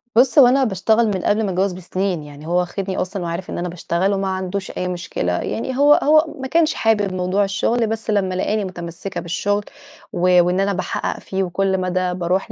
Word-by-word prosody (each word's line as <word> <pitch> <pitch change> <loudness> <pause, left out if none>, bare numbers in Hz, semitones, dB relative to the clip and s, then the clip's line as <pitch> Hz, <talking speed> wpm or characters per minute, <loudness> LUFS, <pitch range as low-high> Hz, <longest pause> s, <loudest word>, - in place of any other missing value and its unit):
بُص، 255 +5 +5
هو 260 - +9
أنا 265 +2 +3
باشتغل 220 +1 +2
من 195 -3 -1
قبل 210 +2 +2
ما 195 - -1
أتجوز 185 +1 0
بسنين، 185 -1 -3
يعني 145 +1 -11
هو 175 +1 +2
واخدني 190 +2 -3
أصلًا 185 0 -3
وعارف 170 +2 -4
إن - - -4
أنا 175 +1 -3
باشتغل 175 +3 -1
وما 195 0 -1
عندوش 190 +1 -3
أي 180 - -3
مشكلة، 175 - -3
يعني 250 - -3
هو 290 +1 +6
هو 310 +2 +5 0.2
ما 265 - -3
كانش 320 +3 +2
حابب 205 -4 +1
موضوع 185 +2 +1
الشغل، 220 +4 0
بس 225 +1 -4
لما 195 -3 +1
لقاني 205 +3 0
متمسكة 175 0 -6
بالشغل 205 +4 -1 0.5
و 180 0 +4
وإن 180 +2 0
أنا 200 +1 +1
باحقق 185 - -3
فيه، 190 0 -3
وكل 190 +1 0
مدى 185 0 -1
باروح 185 +4 -1
190 Hz, 200 wpm, -20 LUFS, 180-210 Hz, 0.5 s, هو